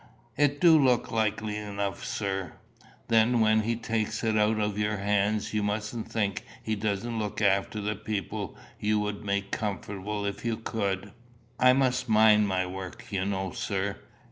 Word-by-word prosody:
"It 145 0 +2
du 160 -4 +6
look 125 -3 +2
likely 110 -1 0
enough, 100 -2 -3
sir." 95 -3 -3 0.5
"Then 115 +2 +4
when 110 0 +4
he 115 +2 0
takes 110 -1 -2
it 110 -1 +1
out 105 +1 +3
of 105 -1 -1
your 105 0 0
hands, 105 +2 0
you 105 - +1
mustn't 105 +2 -3
think 105 -4 0 0.2
he 110 - -1
doesn't 110 +2 -2
look 105 -2 -3
after 100 +1 +2
the 105 +1 -1
people 105 -3 -4 0.2
you 105 0 +1
would 105 -1 -3
make 100 -1 -1
comfortable 105 0 -3
if 100 -1 -4
you 115 -1 -1
could." 100 -3 -2 0.5
"I 125 0 +7
must 130 -2 +1
mind 105 -1 +6
my 95 -1 0
work, 95 +1 -8
you 95 -1 -1
know, 95 -1 -2
sir." 100 0 -2
105 Hz, 165 wpm, -28 LUFS, 100-110 Hz, 0.5 s, I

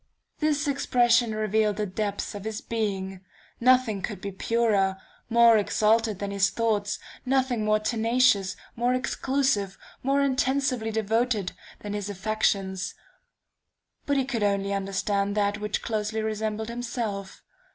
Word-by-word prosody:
"This 300 -1 +1
expression 240 -4 +3
revealed 215 -1 +1
the 210 - -1
depths 205 +1 -3
of 205 -1 -7
his 220 0 -4
being. 195 -4 -3 0.4
Nothing 250 -4 +3
could 200 0 -4
be 200 +1 -5
purer, 200 -2 +1 0.3
more 235 -1 +6
exalted 215 +1 +2
than 200 0 -4
his 200 0 +2
thoughts; 210 -3 0 0.3
nothing 255 -3 +1
more 215 0 +3
tenacious, 225 -3 +2 0.2
more 245 +2 +1
exclusive, 255 -6 0 0.2
more 275 +2 +2
intensely 265 -3 +1
devoted, 220 -1 0 0.3
than 205 -1 -5
his 205 -1 -3
affections.... 195 -2 -1 1.1
But 285 -1 +2
he 265 - +1
could 240 -4 -2
only 200 -1 +1
understand 200 +1 -1
that 205 0 +1
which 210 0 -2
closely 220 0 -2
resembled 220 0 -2
himself.... 230 -5 -4
215 Hz, 130 wpm, -26 LUFS, 200-240 Hz, 1.1 s, more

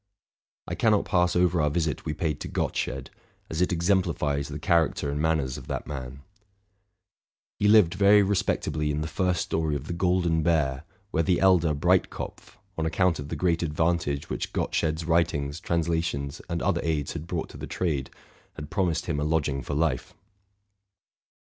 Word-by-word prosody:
I - - -4
cannot 110 -3 +2
pass 90 -1 +2
over 90 -1 +3
our 75 - +2
visit 80 -1 -1
we 75 - -2
paid 80 -5 -2
to - - -5
Gottsched, - - -2 0.4
as 80 +2 -1
it 90 - +2
exemplifies 85 -5 +1
the 75 - -6
charac 85 0 +2
ter 70 - -2
and 75 +1 -2
manners 80 -5 0
of - - -13
that - - -3
man. 70 -1 -7 1.4
He 105 - +3
lived 105 -5 +6
very 100 +1 +6
respectably 90 -6 0
in 75 +1 -1
the 75 - -2
first 90 +2 0
story 80 -2 -1
of 70 0 -4
the 85 - -4
Golden 85 -2 +1
Bear, 75 -4 +1 0.3
where 80 - +2
the 90 +2 +2
elder 85 -5 +4
Breitkopf, 70 - -1 0.2
on 80 - 0
account 85 +1 +1
of 70 0 -6
the - - -3
great 85 -2 +1
advantage 80 -2 0
which - - -4
Gottsched's 80 0 -1
writ 85 +1 +2
ings, 70 0 -3
translations, 80 -4 -1
and 85 -1 -2
other - - +1
aids 75 -4 -1
had 80 0 -6
brought 85 -2 -3
to - - -11
the - - -6
trade, 75 -7 -2 0.5
had 75 +1 -8
promised 85 -5 0
him 80 -4 -1
a - - -1
lodging 75 -3 0
for 70 +4 -4
life. 75 -5 -1
80 Hz, 175 wpm, -26 LUFS, 75-85 Hz, 1.4 s, lived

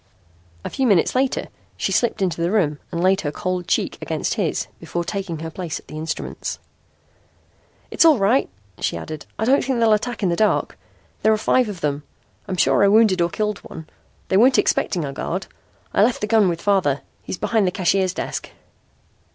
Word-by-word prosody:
A - - -2
few 265 -2 0
minutes 195 -7 +3
later 260 +1 0 0.3
she - - -1
slipped 225 -4 +1
into 170 -3 -1
the 170 - +1
room 165 -8 +1
and 170 +1 -2
laid 190 +1 +3
her 145 - -2
cold 180 +2 -3
cheek - - 0
against - - -2
his - - -1
before 175 - -3
taking 190 -3 -4
her 165 0 -5
place 170 -1 -5
at - - -20
the - - -10
instruments. 160 +1 -4 1.3
"It's - - +3
all 320 -4 +6
right," 215 +6 +2 0.3
she - - -1
added. 150 - -7
"I 220 - -1
don't 270 +4 +3
think 260 -1 -1
they'll 225 -2 +4
attack 220 +1 -2
in 185 - +3
the 170 - +1
dark. 215 +3 +1 0.5
There 220 - +4
are 215 - +3
five 235 +2 +2
of 185 -5 -7
them. 145 -1 -1 0.5
I'm 190 -2 -3
sure 195 - +3
I - - +6
wounded 210 -3 +4
or 170 - +2
killed 210 +3 -2
one. 160 -1 -10 0.4
They 190 - +3
weren't 255 +5 +5
expecting 170 -5 +1
a 140 - -5
guard. 185 +7 -3 0.5
I - - +3
left 230 +3 +2
the - - +1
gun 215 -3 +4
with 170 -1 -4
father. 185 -9 +2 0.2
He's - - -6
behind 210 -1 +1
the - - +1
cashier's 185 0 +1
desk." - - -4
195 Hz, 200 wpm, -21 LUFS, 170-220 Hz, 1.3 s, all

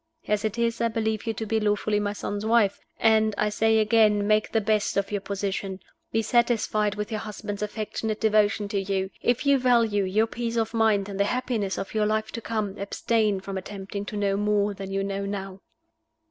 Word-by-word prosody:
As 210 -1 +1
it 220 +1 -2
is, 235 0 0
I 230 - +3
believe 220 -1 -2
you 225 - +1
to 220 - -4
be 220 +1 +1
lawfully 210 0 +1
my 205 0 -1
son's 205 0 -4
wife; 220 -3 +3 0.2
and 220 -1 +3
I 210 - +2
say 220 +1 +2
again, 215 -1 +4
make 215 0 +2
the 225 - +2
best 215 -1 0
of 200 0 0
your 205 -1 -1
position. 195 -1 -3 0.3
Be 225 0 +1
satisfied 220 -3 +1
with 210 +2 -4
your 215 - -1
husband's 210 -1 -6
affectionate 215 +1 -3
devotion 215 -1 +2
to 200 - 0
you. 190 0 -2
If 245 +3 +1
you 280 -1 +4
value 230 -5 +3
your 210 +4 +2
peace 230 0 -4
of 225 0 0
mind 220 -3 +2
and 200 -1 -6
the 200 - +4
happiness 235 -4 -1
of 195 - -5
your 215 -1 +2
life 215 0 -1
to 230 - -5
come, 215 -3 -3
abstain 210 0 0
from 195 0 -4
attempting 200 +1 -6
to 210 - -5
know 200 -1 +1
more 210 0 +1
than 195 -1 -7
you 195 0 -1
know 200 0 -3
now." 195 -1 -5
210 Hz, 205 wpm, -26 LUFS, 200-220 Hz, 0.3 s, again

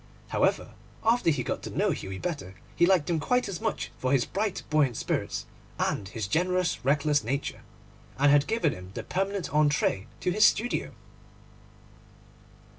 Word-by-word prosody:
However, - - +1 0.3
after 230 -4 +3
he 145 -5 +1
got - - -3
to - - -6
know - - +1
Hughie 95 0 -5
better, 140 - -4 0.2
he 175 - +4
liked 180 -5 +3
him 170 -2 +1
quite 250 +11 +1
as 195 0 -5
much 220 -1 -2
for 130 - 0
his 135 -4 +3
bright, 205 -1 -2
buoyant 140 -7 +3
spirits - - -2 0.3
and 100 - -1
his 105 0 -4
generous, 180 - 0
reckless 145 0 +2
nature, 135 +5 -3 0.6
and 140 +1 +5
had 145 0 +4
given 220 -9 +1
him 90 0 -10
the - - -4
permanent 195 0 -2
entrée 150 -9 +2
to 180 - +1
his 210 +4 +3
studio. 240 +3 +2
150 Hz, 160 wpm, -28 LUFS, 135-190 Hz, 0.6 s, and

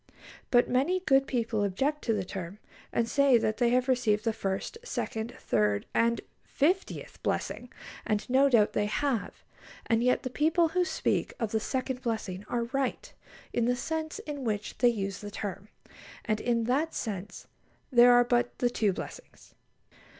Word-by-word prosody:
But 245 -1 +4
many 285 +9 +1
good 270 -6 +3
people 230 -4 0
object 270 +10 0
to 230 - +2
the 200 -3 -1
term, 185 0 -6 0.3
and 230 - +1
say 280 -1 +4
that 215 -1 0
they 240 -1 +3
have 250 +1 +2
received 230 -5 +2
the 225 -1 0
first, 195 - -3
second, 230 - -4
third, 105 -1 +1
and 235 0 +2 0.2
fiftieth 360 +7 -1
blessing; - - -2 0.3
and 210 -2 -1
no 270 +2 +4
doubt 220 -5 +4
they 205 - +1
have; 250 +1 -2 0.4
and 230 0 +2
yet 250 0 +2
the 255 - -4
people 325 +4 +2
who 360 +2 +1
speak - - -1
of 225 -4 -2
"the 220 - +1
second 260 +2 -3
blessing" 215 -5 -3
are 240 -1 0
right, 265 +2 -3 0.4
in 235 - +1
the 245 +1 +2
sense 315 +5 -3
in 290 -3 -6
which 210 -3 -2
they 245 - +6
use 200 -4 -3
the 205 - -6
term; 205 0 -6 0.6
and 215 -1 0
in 235 -1 +1
that 280 +8 0
sense 205 -3 -5 0.5
there 245 -1 +7
are 245 0 +7
but 240 0 0
the 245 -1 +1
two 210 -5 +1
blessings. - - -10
240 Hz, 170 wpm, -29 LUFS, 215-265 Hz, 0.6 s, there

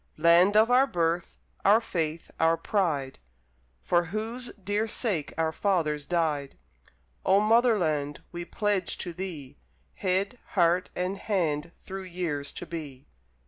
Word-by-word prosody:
Land 170 +5 +5
of 220 +3 +5
our 260 +2 +5
Birth, 170 -4 -1 0.3
our 210 +3 +6
faith, 165 -7 -3
our 165 0 +4
pride, 155 -11 -1 0.6
For 175 0 +2
whose 225 +7 -4
dear 205 +2 -2
sake 205 - -1
our 160 -1 +1
fathers 160 -6 0
died, 155 -5 -1 0.7
Oh 195 - +5
Motherland, 205 - +2
we 175 0 -5
pledge 195 +1 -1
to 175 - -5
thee, 160 -7 -7 0.3
Head, 195 +5 -1
heart, 175 -1 +3
and 185 +2 -2
hand 170 -6 -1
through 190 0 -7
years 170 -6 -3
to - - -6
be! 150 -6 -7
175 Hz, 130 wpm, -28 LUFS, 160-205 Hz, 0.7 s, our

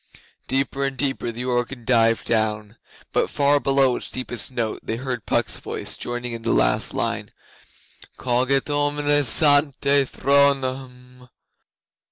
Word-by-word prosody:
Deeper 135 +1 0
and 135 -1 -2
deeper 135 -4 -1
the 120 +2 -5
organ 120 0 -2
dived 115 -2 +2
down, 110 -1 -1 0.4
but - - +1
far 145 0 +2
below 135 -1 +2
its - - -4
deepest 125 -2 -3
note 120 -4 -3
they 110 - -4
heard 125 -2 -5
Puck's - - 0
voice - - -4
joining 120 0 -4
in 115 - -6
the 115 - -1
last - - +1
line: - - -2 0.9
'Coget 130 +2 +1
omnes 145 -1 +2
ante 145 -1 +3
thronum. 130 -2 0
130 Hz, 130 wpm, -22 LUFS, 120-140 Hz, 0.9 s, ante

